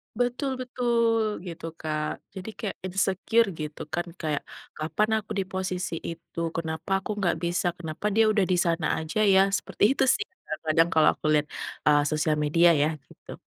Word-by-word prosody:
Betul, 245 +3 0
betul 235 -3 +1 0.2
gitu, 165 -1 -7
Kak. 155 -1 -2 0.3
Jadi 190 +3 -6
kayak 210 - -3
insecure 195 +4 +2
gitu 150 0 -5
kan. 175 +1 -1
Kayak 150 -2 -1 0.4
kapan 185 +8 0
aku 210 - -13
di - - +1
posisi 185 -2 -2 0.2
itu? 165 0 -8 0.2
Kenapa 160 +2 -4
aku 200 - -5
nggak 175 -4 +2
bisa? 175 +2 0
Kenapa 160 +3 -6
dia 225 - +6
udah 205 -3 +2
di - - +4
sana 165 -1 +1
aja 160 +7 -3
ya? 190 - +7 0.2
Seperti - - -4
itu - - +2
sih, 420 - -2 0.2
kadang-kadang 160 +1 +1
kalau 160 -1 +6
aku - - -12
lihat, 150 0 +2 0.4
ah, 145 0 +6
sosial 155 0 +1
media 170 +4 +5
ya 150 - +4 0.2
gitu. - - -12
175 Hz, 170 wpm, -26 LUFS, 160-210 Hz, 0.4 s, ya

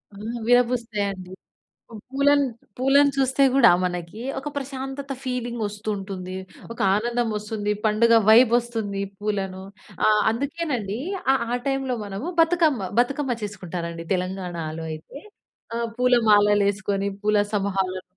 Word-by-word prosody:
ఆ! - - -12 0.3
విరబూస్తాయండి. 225 -6 +1 0.8
పూలను, 280 +1 +3 0.3
పూలను 280 +2 +4
చూస్తే 265 +1 +2
కూడా 245 -6 +7
మనకి 180 +4 -4 0.2
ఒక 285 +2 -5
ప్రశాంతత 270 0 -5
ఫీలింగ్ 245 -2 -3
వస్తూ 210 +1 -5
ఉంటుంది. 190 -1 -6 0.4
ఒక 235 - -13
ఆనందం 235 +2 0
వస్తుంది. 210 0 -2
పండుగ 225 +2 +4
వైబ్ 235 +1 +7
వస్తుంది. 220 -5 -3 0.2
పూలను 195 -3 -3 0.4
ఆహ్, 210 -1 +4
అందుకేనండి 255 -5 -3 0.3
ఆహ్, 265 - +1
ఆ 245 - +1
టైమ్‌లో 270 -2 -1
మనము 200 +9 -6
బతుకమ్మ 320 - +2
బతుకమ్మ 265 -1 -1
చేసుకుంటారండి 170 -4 -5
తెలంగాణాలో 175 -4 -4
అయితే. 155 - -9 0.6
ఆహ్, 235 0 -1
పూలమాలలు 210 -5 +4
వేసుకొని 200 0 -1
పూల 210 0 +2 0.2
సమూహాలను 190 -2 -1
220 Hz, 115 wpm, -24 LUFS, 195-255 Hz, 0.8 s, కూడా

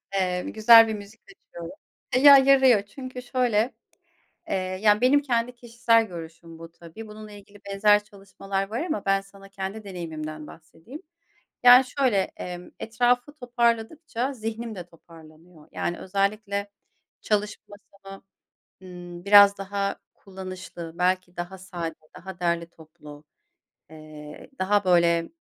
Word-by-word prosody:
Eee, 180 -2 0
güzel 225 +1 +7
bir 220 - -3
müzik 205 +1 -11
seçiyorum. 170 - -11 0.4
Baya 280 +2 +9
yarıyor 265 -5 +5
çünkü 255 +4 -9
şöyle, 245 -2 0 0.8
eee, - - -2 0.3
yani 210 -1 +4
benim 280 +4 +4
kendi 245 -2 -1
kişisel 235 -1 +1
görüşüm 165 -2 -11
bu 165 0 -11
tabii. 170 +7 -12
Bununla 215 0 -11
ilgili 205 0 -15
benzer 205 +1 +3
çalışmalar 195 -1 -6
var 230 +5 -3
ama 310 - -3
ben 195 0 +2
sana 195 0 -17
kendi 195 +2 -7
deneyimimden 155 -5 -7
bahsedeyim. 170 - -14 0.6
Yani 245 +1 +8
şöyle, 255 -6 0 0.2
emm, 180 0 -8
etrafı 245 +4 0
toparladıkça 245 +1 -2
zihnim 225 -1 -6
de 180 -2 -8
toparlanıyor. 165 -1 -18
Yani 175 - -3
özellikle 200 +1 -2 0.5
çalışma 210 -1 -3 0.3
masamı, 195 0 -11 0.6
ımm, 175 -1 -11
biraz 200 0 +7
daha 200 0 -3 0.2
kullanışlı, 185 -3 -9
belki 185 0 -1
daha 175 +2 -6
sade, 175 -3 -6 0.2
daha 190 0 -10
derli 170 -1 -1
toplu, 155 -3 -15 0.7
eee, 155 -1 -12
daha 200 +2 +1
böyle 170 -2 +2
200 Hz, 125 wpm, -25 LUFS, 175-230 Hz, 0.8 s, Baya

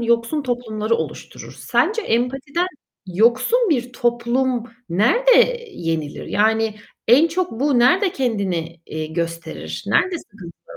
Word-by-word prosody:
yoksun 235 +5 +1
toplumları 230 -3 -2
oluşturur. - - -6
Sence 450 0 +1
empatiden 270 - -1 0.4
yoksun 235 - +3
bir 250 -4 0
toplum 240 +1 0 0.2
nerde 475 - +3
yenilir 165 - -4
yani 220 +1 +1 0.3
en 280 +8 +6
çok 360 +2 -1
bu 280 -2 +3
nerede 360 - +4
kendini, 185 -10 -2
eee, 155 0 -4
gösterir? 165 +1 -5
Nerede 370 -2 +2
sıkıntılar 205 - -13
240 Hz, 110 wpm, -21 LUFS, 205-295 Hz, 0.4 s, en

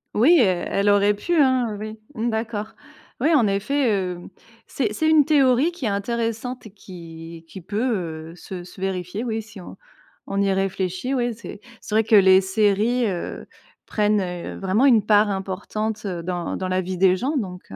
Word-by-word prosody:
Oui, 300 +11 +6
elle 185 -6 +2
elle 200 +1 +2
aurait 205 0 +4
pu, 345 +12 -3
hein, 260 -7 +2
oui, 215 +1 -6 0.2
mmh 235 -2 -2
d'accord. 220 -1 -4 0.4
Oui 325 - +2
en 250 -8 +4
effet, 225 +6 +1
heu, 180 -2 -4 0.5
c'est 220 -6 -2
c'est 315 +8 +1
une 310 -2 +5
théorie 275 0 +3
qui 340 -7 -7
est - - +2
intéressante 230 +3 -3
et - - -14
qui 165 -4 -11
qui 190 - -9
peut, 180 -6 -3
heu, - - -13
se 180 0 -8
se 180 - -14
vérifier 190 +3 -3
oui, 225 -2 -2
si 210 -2 -13
on 180 - -10 0.5
on 195 - -2
y 195 -1 +2
réfléchit, 190 +5 -2
oui, 240 -1 0
c'est 210 -2 -10 0.2
c'est 215 - -4
vrai 220 - +4
que 220 0 +3
les 190 -1 +7
séries, 210 +5 +1
heu, 180 -4 -5 0.4
prennent, 210 -1 +1
heu, 180 -2 -5
vraiment 195 +7 +2
une 235 -6 +5
part 210 0 +4
importante, 205 +3 -4
heu, 180 -4 -3
dans 175 0 -3
dans 185 - -3
la 185 0 0
vie 185 0 -5
des 185 -1 +5
gens 270 +9 -2
donc 185 -6 -5
heu. - - -7
205 Hz, 195 wpm, -23 LUFS, 185-235 Hz, 0.5 s, les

